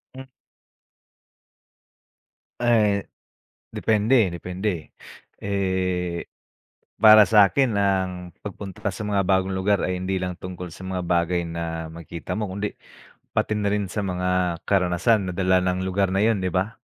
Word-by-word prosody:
Hm 130 0 -10 2.3
Eh, 105 -4 +2 0.7
depende 110 +1 +3
eh - - -3
depende 90 0 -4 0.5
eh. 95 -3 -1 0.7
Para 110 -1 +9
sa'kin 110 +5 +4
ang 95 -2 -1 0.2
pagpunta 100 -2 -7
ka 100 - 0
sa 100 - -7
mga 100 -2 0
bagong 95 0 +2
lugar 100 +1 +1
ay 90 0 -1
hindi 95 0 -2
lang 90 -1 -3
tungkol 90 -1 -7
sa 95 +2 -10
mga 95 -1 -3
bagay 85 0 +1
na 80 -1 -4
makikita 85 +3 -6
mo, 110 - -1
kundi, 100 +2 -4 0.6
pati 110 -1 0
na 105 - -1
rin 100 -3 -2
sa 105 0 -2
mga 90 -2 -1
karanasan 95 +2 +2
na - - -5
dala 95 0 +3
ng 90 0 0
lugar 95 0 0
na 100 - +2
yun, 110 -2 +3
'di 95 -2 -3
ba? 100 +5 -1
95 Hz, 140 wpm, -24 LUFS, 90-105 Hz, 2.3 s, Para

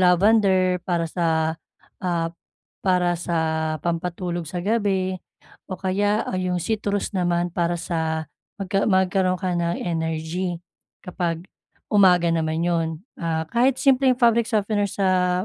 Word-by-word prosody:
lavender 185 0 +4
para 170 -2 +1
sa, 160 -1 0 0.4
ah, 170 -2 -1 0.5
para 180 -2 +2
sa 160 -2 -1
pampatulog 175 0 -2
sa 175 +1 -4
gabi 195 -4 0 0.5
o 185 - -3
kaya 205 +3 0 0.2
yung 180 -1 -1
citrus 205 0 -1
naman 175 -2 0
para 170 0 0
sa 160 -2 -2 0.3
magka 195 0 0
magkaroon 185 -1 +2
ka 185 -1 -2
ng 170 0 0
energy 165 +1 -2 0.5
kapag 175 -2 -3 0.5
umaga 180 -4 +5
naman 160 0 0
'yun. 170 -2 +1 0.3
Ah, 160 -1 -1
kahit 250 +2 +3
simpleng 260 -1 +3
fabric 235 -2 +3
softener 205 -2 0
sa 185 -1 +1
180 Hz, 120 wpm, -23 LUFS, 170-195 Hz, 0.5 s, umaga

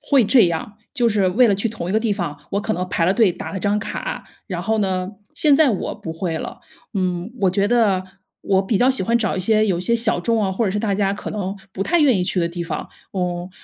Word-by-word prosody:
会 275 -5 +3
这 225 -1 +5
样， 200 +6 -4 0.2
就 245 -4 +2
是 205 -4 +2
为 240 +7 +4
了 205 - +3
去 200 +4 -1
同 210 -6 -6
一 - - -1
个 220 - +2
地 220 -2 0
方， 175 -7 -4
我 200 - 0
可 215 +1 -2
能 180 -3 -3
排 170 - 0
了 185 - +3
队、 220 -3 +4
打 175 - -7
了 190 - -4
张 205 +2 +1
卡， - - -5 0.2
然 180 -5 -4
后 220 0 0
呢 185 -2 -1 0.3
现 300 -2 +4
在 305 0 +5
我 205 - -2
不 165 - -7
会 165 -1 -2
了。 - - -7 0.3
嗯， 185 0 -1
我 190 - +4
觉 200 +2 +1
得 210 -6 +3 0.4
我 195 0 +2
比 195 +1 0
较 255 +2 +4
喜 260 - 0
欢 230 +5 +2
找 215 -4 -1
一 185 - -1
些 215 +2 +3
有 190 -4 +1
一 - - -3
些 235 +6 +2
小 230 -4 +3
众 225 +5 +1
啊， 195 - 0
或 190 +5 -1
者 200 - +1
是 210 - -1
大 205 -2 0
家 195 0 +1
可 200 - -6
能 195 -2 -3 0.2
不 195 - -2
太 340 - +2
愿 275 -7 +5
意 180 - 0
去 180 -1 0
的 170 - 0
地 170 0 -5
方， 165 - -5 0.2
嗯， 180 -2 -2
200 Hz, 290 characters per minute, -21 LUFS, 185-225 Hz, 0.4 s, 这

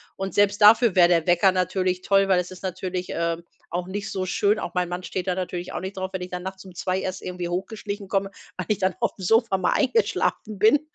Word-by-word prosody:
Und 195 0 -4
selbst 205 +1 +3
dafür 220 0 +7
wäre 175 -1 +7
der 165 -2 +3
Wecker 175 +2 +5
natürlich 185 0 0
toll, 195 0 +3
weil 185 - +4
es 180 0 -4
ist 185 - -11
natürlich, 185 0 -3
ähm, 170 0 -2 0.3
auch 180 +1 -3
nicht 200 +1 -4
so 190 -1 -2
schön. 205 +3 +2
Auch - - -5
mein 180 -1 +1
Mann 180 +1 -4
steht 180 0 -4
da 185 - +2
natürlich 180 -1 -4
auch - - -3
nicht 190 +1 -6
drauf, 190 0 -3
wenn 190 - -3
ich 180 - -5
dann 180 0 -5
nachts 190 0 -7
um 185 -2 -13
2:00 185 +2 -1
erst 185 -1 -4
irgendwie 180 -1 -4
hochgeschlichen 200 +2 -4
komme, 195 0 0 0.3
weil 185 -2 -5
ich 210 - +2
dann 190 -2 +1
aufm - - -1
Sofa 225 0 +3
mal 185 - +1
eingeschlafen 245 - 0
bin. 220 +8 +5
185 Hz, 240 wpm, -24 LUFS, 180-200 Hz, 0.3 s, dafür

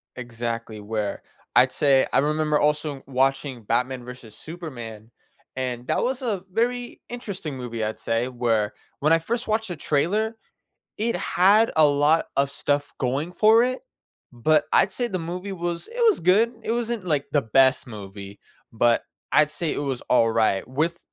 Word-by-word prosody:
Exactly, 115 -2 -5
where, 105 -1 -3 0.4
I'd - - +6
say 135 -2 +3
I - - +4
remember 150 +1 +1
also 150 -2 0
watching 135 -1 0
Batman 125 +3 -1
v 125 -2 -10
Superman, 120 -6 -9 0.5
and 125 -1 -3
that - - +1
was 260 +2 -1
a 205 -7 -2
very 240 +4 -1
interesting 200 - -6
movie, 120 -2 -5
I'd 110 +1 -3
say, 115 +2 -1
where 115 -4 0 0.3
when 155 +2 +3
I 165 - +4
first 235 +8 -3
watched 220 0 0
the 175 - -3
trailer, 210 +11 0 0.6
it 230 +2 0
had 200 +5 +4
a 155 - +6
lot 145 +3 +3
of 140 0 +2
stuff 145 +1 -1
going 140 +7 -1
for 220 +5 +5
it, 255 +1 -2 0.5
but 150 +5 +2
I'd 190 - +4
say 245 - -1
the 185 - -2
movie 180 +4 -5
was 170 -2 -4
it 470 +2 -10
was 420 - +2
good. 205 +7 +4
It 220 - -4
wasn't, 235 -4 -2
like, 150 -4 0
the 145 -2 +3
best 130 +4 +3
movie, 100 -2 -9 0.3
but 115 +1 +3 0.3
I'd 150 -1 +4
say 155 0 -2
it - - -3
was 135 -4 -2
all 115 -2 +3
right. 110 -3 +1
With 160 +6 -1
145 Hz, 170 wpm, -24 LUFS, 120-185 Hz, 0.6 s, I'd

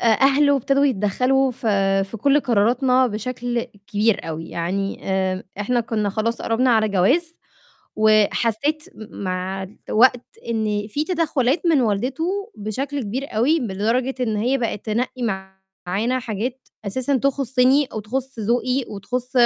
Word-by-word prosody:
آآ، - - 0
أهلُه 275 +5 +4
ابتدوا 275 +2 +2
يتدخَّلوا 255 +4 +2
ف 240 -1 -8 0.4
في 225 - -7
كل 280 +6 +3
قراراتنا 250 +3 +3
بشَكل 240 +2 -3 0.3
كبير 210 -3 +1
أوي، 160 +1 -5
يعني 195 +3 -3
آمم، 190 -1 0 0.2
إحنا 240 +4 +1
كنّا 215 -3 -1
خلاص 230 +3 -2
قرّبنا 245 +3 +2
على 220 -2 +3
جواز 270 - +2 0.6
وحسّيت 220 +7 +2
م 210 -2 -9
مع 185 +1 -3 0.2
الوقت 245 +2 +4 0.3
إنّي 215 -2 -1
في 290 +8 -2
تدخُّلات 310 -5 0
من 320 -5 +4
والدته 290 - -1
بشَكل 265 +7 -3
كبير 250 +6 -4
أوي، 285 +8 +3
ب 225 -6 -3
لدرجة 235 +7 0
إن 220 -4 0
هي 250 +6 +1
بقت 230 -4 -3
تنقّي 245 +3 -2 0.6
معانا 220 +8 0
حاجات 245 +3 -4 0.2
أساسًا 260 +7 0
تخُصّني 265 +1 +2
أو 220 - -6
تخُص 260 +4 -4
ذوقي 245 +4 0
وتخُص 250 +5 -4
240 Hz, 140 wpm, -22 LUFS, 210-265 Hz, 0.6 s, أهلُه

